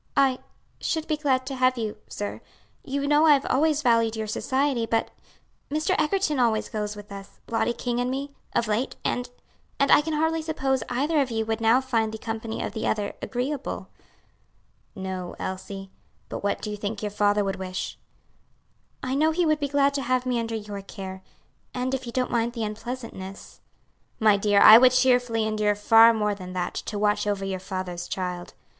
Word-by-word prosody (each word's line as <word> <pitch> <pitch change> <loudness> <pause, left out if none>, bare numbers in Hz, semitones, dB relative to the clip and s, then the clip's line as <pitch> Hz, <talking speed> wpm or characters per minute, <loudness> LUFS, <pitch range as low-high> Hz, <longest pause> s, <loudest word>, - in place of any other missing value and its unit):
"I 265 -2 +4 0.4
should 320 -1 -1
be 310 - +1
glad 265 -4 +1
to 270 - -4
have 255 0 +2
you, 220 -2 -3
sir; 205 - -5 0.4
you 280 0 -2
know 295 +2 +5
I 300 - +8
have 275 -1 +1
always 300 +2 +2
valued 230 -2 +3
your 220 0 -3
society, 260 +2 0
but 225 0 0 0.6
Mr. 305 +1 0
Egerton 310 -3 +1
always 230 -3 +1
goes 210 -1 -3
with 205 0 -11
us 200 0 -10
Lottie 230 +1 +1
King 240 0 -2
and 245 0 0
me 275 +2 -4 0.2
of 235 - +2
late; 215 +5 -1
and 245 0 -1 0.5
and 275 - +3
I - - +8
can 315 +1 -3
hardly 320 +1 +1
suppose 270 -4 -1
either 290 +5 +1
of 265 - -1
you 225 -1 -1
would 225 +1 -2
now 230 +3 +4
find 225 -4 0
the 220 - -5
company 225 0 -4
of - - -4
the 220 - -2
other 205 -1 -1
agreeable." 265 +3 -3 1.1
"No, 190 -2 -5
Elsie; 190 +1 -6 0.4
but - - -6
what 200 - -1
do 210 - -3
you 210 - -4
think 205 +1 -4
your 210 - -2
father 205 0 +2
would 195 0 -2
wish?" 185 -1 -5 1.0
"I 255 - -2
know 305 +3 +3
he 340 +2 +1
would 310 -1 +2
be 285 - -1
glad 280 0 +3
to 280 - -1
have 255 0 0
me 250 -2 0
under 230 0 -3
your 205 -2 -6
care, 190 -1 -8 0.5
and 255 +1 -1
if 260 -1 -3
you - - -4
don't 255 +1 -1
mind 235 0 0
the 230 -2 -3
unpleasantness." 215 -3 -7 0.6
"My 215 -2 +5
dear, 200 0 +3
I 220 +1 +11
would 255 0 +6
cheerfully 245 -3 +3
endure 215 -1 +1
far 225 +2 +7
more 210 -2 0
than 185 -2 -8
that, 180 -1 -2
to 210 - -4
watch 210 0 +1
over 200 -1 -1
your 190 -1 -3
father's 185 -2 -5
child. 180 -1 -4
230 Hz, 195 wpm, -25 LUFS, 205-265 Hz, 1.1 s, I